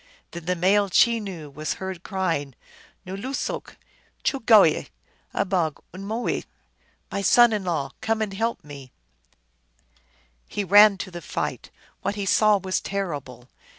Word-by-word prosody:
Then 170 -1 -8
the 180 +1 0
male 195 +3 +3
Chenoo 195 -9 +1
was 155 +2 -3
heard 190 -2 -6
crying: 170 - -2 0.2
" - - -27
N 190 +1 -6
loosook! 260 +7 -4 0.5
choogooye! 220 - +4 0.4
abog 180 -6 0
unu 185 - -8
mooe! 225 +4 -2 0.2
" - - -41
" - - -41
My 200 - -2
son 240 +3 +6
in 210 -2 -1
law, 155 -7 -2
come 220 0 0
and 200 -2 -5
help 225 +4 -2
me! 140 -3 -11 0.8
" - - -45 0.7
He 205 - -3
ran 205 +1 +7
to 190 - -6
the 175 0 -7
fight. - - -4 0.3
What 200 +1 -2
he 200 -1 -3
saw 210 +1 +4
was 190 -1 -2
terrible 145 -11 -5
190 Hz, 150 wpm, -24 LUFS, 165-210 Hz, 0.8 s, ran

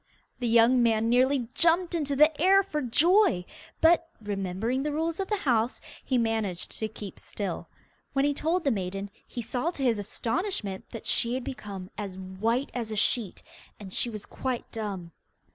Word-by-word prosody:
The 245 - -1
young 235 +2 +5
man 225 -1 +3
nearly 255 0 +3
jumped 340 +2 +4
into 290 -4 -1
the 300 +1 +4
air 390 +2 +6
for 305 -6 -3
joy, 295 - +3 0.4
but, 330 0 +5
remembering 205 +4 -2
the 300 +1 -1
rules 325 +3 -1
of 385 - -1
the 420 - 0
house, 240 - +1 0.2
he 260 - +1
managed 220 -6 -1
to 220 - -1
keep 205 -3 -9
still. 195 -5 -5 0.4
When 275 0 +2
he 290 - +2
told 325 +5 0
the 275 - +2
maiden, 195 -1 -3 0.2
he 240 - -5
saw 245 +7 -1
to 290 -6 -4
his 235 -5 +2
astonishment 220 - -3
that 230 - -8
she 235 +1 +2
had 260 - -3
become 200 -8 -7
as 195 -3 -5
white 215 +8 -1
as 230 -3 -3
a - - -2
sheet, 210 -1 0 0.4
and 195 -3 -9
she 240 - +1
was 215 -3 -7
quite 255 -2 -4
dumb. 195 -6 -5
235 Hz, 180 wpm, -28 LUFS, 205-290 Hz, 0.4 s, air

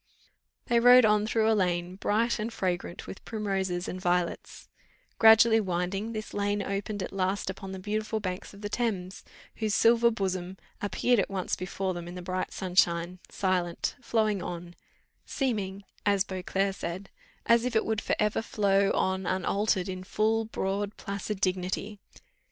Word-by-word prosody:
They 235 - +3
rode 245 0 +8
on 210 0 +3
through 220 -1 +2
a 225 - +4
lane 180 -3 0
bright 220 +4 +1
and 220 +2 -2
fragrant 180 -4 -3
with - - -9
primroses 195 -5 -2
and 185 - -5
violets; 180 -1 -1 0.5
gradually 225 0 +7
winding, 195 +3 -2
this 215 -1 -6
lane 205 0 0
opened 200 0 -3
at - - -6
last 190 0 -1
upon 190 0 -8
the 190 - -5
beautiful 215 +3 -2
banks 185 -3 -5
of 200 - -14
the 205 - -3
Thames, 205 -5 -2 0.3
whose 215 -2 0
"silver 235 +1 +5
bosom" 190 -4 -3 0.2
appeared 235 +3 +2
at - - 0
once 190 -2 -2
before 185 +1 -3
them 175 -1 -6
in 175 - -8
the 180 - -7
bright 185 +1 -3
sunshine, 180 -1 +1
silent, 180 -3 -1
flowing 215 -5 +1
on, 175 0 -6 0.5
seeming, 205 -7 -2 0.2
as 200 -2 +3
Beauclerc 195 +1 -2
said, 185 +2 -6 0.3
as 235 0 +4
if 250 -2 -2
it 220 - +3
would 220 -1 -1
for - - 0
ever 210 0 +1
flow 200 -3 +2
on 190 -1 0
unaltered 190 +1 0
in 185 -1 -5
full, 220 +3 +1
broad, 205 -1 -3
placid 200 0 -4
dignity. 190 +2 -2
195 Hz, 160 wpm, -28 LUFS, 185-215 Hz, 0.5 s, rode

